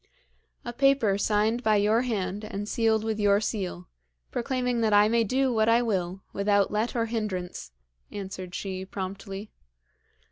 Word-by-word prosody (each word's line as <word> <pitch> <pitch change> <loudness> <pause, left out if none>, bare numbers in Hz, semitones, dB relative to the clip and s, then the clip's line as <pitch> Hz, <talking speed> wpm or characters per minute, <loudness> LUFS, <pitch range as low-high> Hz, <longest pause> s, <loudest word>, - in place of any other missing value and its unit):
'A 240 - -4
paper 270 -6 +3
signed 215 +3 +1
by 220 -3 +3
your 210 +3 +3
hand, 205 -4 -2
and 205 -1 -5
sealed 220 -1 +1
with 220 -1 -2
your 205 -1 +4
seal, 195 - -3 0.4
proclaiming 250 -1 -1
that 220 -2 +2
I 205 0 +6
may 230 +1 +3
do 260 +3 +1
what 220 0 +3
I 235 +1 +4
will, 190 -4 -2
without 200 0 +2
let 215 +4 -1
or 230 -1 +1
hindrance,' 200 - -4 0.4
answered 185 -2 -6
she 190 -1 -4
promptly. 195 +2 -6
210 Hz, 150 wpm, -27 LUFS, 195-230 Hz, 0.4 s, I